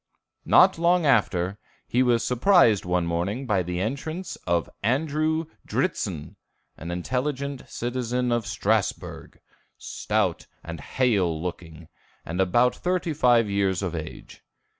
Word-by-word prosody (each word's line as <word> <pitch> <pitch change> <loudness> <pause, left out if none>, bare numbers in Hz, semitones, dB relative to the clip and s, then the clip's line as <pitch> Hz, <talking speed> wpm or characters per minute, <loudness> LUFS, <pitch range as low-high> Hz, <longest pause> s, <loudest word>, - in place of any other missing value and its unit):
Not 185 -3 +5
long 170 0 +3
after, 100 -7 +2 0.3
he 125 - +1
was 120 -2 +2
surprised 125 - +4
one 90 -1 0
morning 90 +10 -2
by 105 -6 +1
the 90 0 -3
entrance 155 - -4
of 85 -1 +1
Andrew 155 +7 0 0.2
Dritzhn, 95 - -2 0.4
an 85 - -8
intelligent 130 - -3
citizen 125 0 -2
of 120 -3 0
Strasbourg, 100 +1 -2 0.4
stout - - -2 0.2
and 85 -1 -7
hale 95 - +1
looking, 85 -2 -7 0.4
and 90 +4 -2
about 120 +7 +3
thirty 180 -2 -1
five 120 -6 +4
years 100 -2 0
of 90 -3 -2
age. 80 -2 -8
115 Hz, 120 wpm, -25 LUFS, 90-140 Hz, 0.4 s, Not